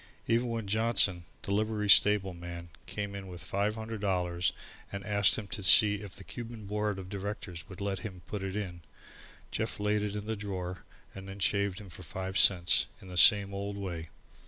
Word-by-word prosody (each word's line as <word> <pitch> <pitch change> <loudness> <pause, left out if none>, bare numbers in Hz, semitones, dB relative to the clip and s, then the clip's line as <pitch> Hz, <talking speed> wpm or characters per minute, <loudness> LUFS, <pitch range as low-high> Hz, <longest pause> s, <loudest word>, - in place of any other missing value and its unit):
Even 120 +2 +2
when 115 -2 -3
Johnson, 100 -4 +2 0.2
the 100 - -2
livery 105 0 0
stable 100 -1 +6
man, 85 0 -8 0.2
came 100 +2 -4
in 100 -1 -7
with 90 -1 -8
five 100 +3 -1
hundred 110 -1 -6
dollars 90 -3 0 0.4
and 100 0 -6
asked 100 -1 +5
him 110 - -5
to 115 - -4
see 105 +1 +7
if 100 -3 -9
the - - -10
Cuban 115 +1 -8
Board 105 0 -1
of 95 -1 -7
Directors 95 -4 -6
would 95 - -10
let 100 -2 -2
him 90 -4 -8
put 105 +1 -5
it 95 0 -4
in, 90 -5 -4 0.7
Jeff - - -2
laid 105 0 +1
it 105 0 -3
in 105 0 -4
the 110 +1 -2
drawer 95 -3 -5 0.3
and 95 0 -9
then 95 - -8
shaved 100 -1 +1
him 100 -4 -11
for 95 - -11
five 95 +4 -6
cents, 90 -2 +5
in 95 - -13
the 90 - -8
same 100 +1 +6
old 100 +1 -4
way. 85 -5 -5
100 Hz, 200 wpm, -30 LUFS, 95-105 Hz, 0.7 s, see